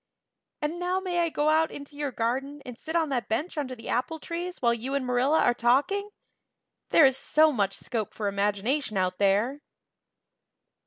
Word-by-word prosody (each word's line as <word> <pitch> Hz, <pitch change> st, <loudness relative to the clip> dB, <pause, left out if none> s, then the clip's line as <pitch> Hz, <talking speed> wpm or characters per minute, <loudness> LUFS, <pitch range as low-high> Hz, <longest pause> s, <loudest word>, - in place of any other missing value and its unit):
And 320 Hz, +4 st, -2 dB
now 360 Hz, +1 st, 0 dB
may 360 Hz, -2 st, -2 dB
I 340 Hz, -1 st, +2 dB
go 300 Hz, -1 st, +1 dB
out 315 Hz, +1 st, +3 dB
into 285 Hz, 0 st, -10 dB
your 290 Hz, -1 st, -3 dB
garden 270 Hz, +5 st, -2 dB
and 250 Hz, -, -7 dB
sit 320 Hz, +7 st, -6 dB
on 325 Hz, -3 st, +2 dB
that 250 Hz, -4 st, -2 dB
bench 295 Hz, +11 st, -2 dB
under 270 Hz, -4 st, -3 dB
the 225 Hz, -1 st, -11 dB
apple 250 Hz, +7 st, -1 dB
trees 350 Hz, +3 st, -5 dB
while 235 Hz, -2 st, +3 dB
you 250 Hz, +4 st, -3 dB
and 275 Hz, -2 st, -1 dB
Marilla 250 Hz, +5 st, +2 dB
are 245 Hz, -, +4 dB
talking? 280 Hz, -, +1 dB, 0.8 s
There 320 Hz, -, +7 dB
is 265 Hz, -1 st, +4 dB
so 310 Hz, +2 st, +4 dB
much 200 Hz, -7 st, 0 dB
more -, -, -12 dB
scope 220 Hz, -5 st, -2 dB
for 210 Hz, -, -2 dB
imagination 205 Hz, +5 st, 0 dB
out 185 Hz, -1 st, 0 dB
there." 210 Hz, +8 st, +2 dB
270 Hz, 190 wpm, -27 LUFS, 235-315 Hz, 0.8 s, There